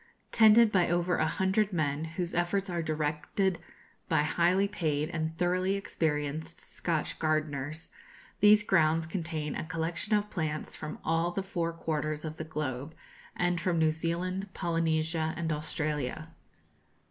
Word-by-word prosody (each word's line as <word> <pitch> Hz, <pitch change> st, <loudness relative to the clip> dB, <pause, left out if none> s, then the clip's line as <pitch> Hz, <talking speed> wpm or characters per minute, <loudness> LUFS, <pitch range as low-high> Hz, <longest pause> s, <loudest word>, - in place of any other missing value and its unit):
Tended 220 Hz, 0 st, +7 dB
by 180 Hz, -4 st, +3 dB
over 175 Hz, +1 st, +1 dB
a 155 Hz, -, +2 dB
hundred 195 Hz, +4 st, +1 dB
men, 155 Hz, -3 st, 0 dB
whose 170 Hz, +2 st, -3 dB
efforts 180 Hz, +3 st, 0 dB
are 170 Hz, -1 st, -1 dB
directed 155 Hz, +4 st, -1 dB, 0.5 s
by 160 Hz, -2 st, +3 dB
highly 175 Hz, +5 st, +3 dB
paid 155 Hz, -5 st, -1 dB
and 160 Hz, -1 st, -3 dB
thoroughly 185 Hz, +2 st, +1 dB
experienced 160 Hz, -4 st, -2 dB
Scotch 165 Hz, -3 st, -3 dB
gardeners, 155 Hz, -1 st, -1 dB, 0.5 s
these 210 Hz, +1 st, +7 dB
grounds 165 Hz, -4 st, +3 dB
contain 160 Hz, -3 st, -3 dB
a -, -, -3 dB
collection 165 Hz, +4 st, -1 dB
of 210 Hz, 0 st, -3 dB
plants 155 Hz, -3 st, -3 dB
from 155 Hz, 0 st, -6 dB
all 165 Hz, +1 st, +2 dB
the 190 Hz, +2 st, -3 dB
four 170 Hz, -3 st, -2 dB
quarters 155 Hz, -2 st, -2 dB
of 155 Hz, 0 st, -5 dB
the -, -, -4 dB
globe, 150 Hz, -2 st, -4 dB, 0.4 s
and 175 Hz, -1 st, 0 dB
from 175 Hz, -2 st, +1 dB
New 160 Hz, -1 st, +4 dB
Zealand, 180 Hz, +4 st, -2 dB
Polynesia, 160 Hz, -1 st, 0 dB
and 165 Hz, -2 st, -1 dB
Australia. 150 Hz, -1 st, -3 dB
165 Hz, 140 wpm, -30 LUFS, 155-180 Hz, 0.5 s, Tended